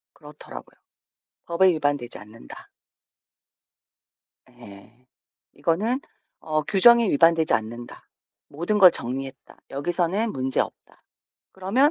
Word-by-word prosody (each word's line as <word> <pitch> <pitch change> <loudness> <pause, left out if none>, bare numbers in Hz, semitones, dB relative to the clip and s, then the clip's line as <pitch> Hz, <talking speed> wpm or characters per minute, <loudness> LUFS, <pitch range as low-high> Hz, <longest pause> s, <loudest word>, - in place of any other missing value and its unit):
그렇더라고요. 150 -1 -12 0.7
'법에 180 +3 +3
위반되지 145 -5 -2
않는다.' 105 +2 -13 1.8
예. 110 -5 -15 0.6
이거는 215 +10 -1 0.4
어 155 -1 -1
'규정에 230 +6 +5
위반되지 165 +1 +3
않는다. 120 +2 -4 0.5
모든 170 +8 -2
걸 185 -2 +9
정리했다. 130 -1 -6
여기서는 175 +9 -1
문제없다. 130 0 -3 0.5
그러면 215 +11 +2
155 Hz, 240 characters per minute, -24 LUFS, 130-190 Hz, 1.8 s, 걸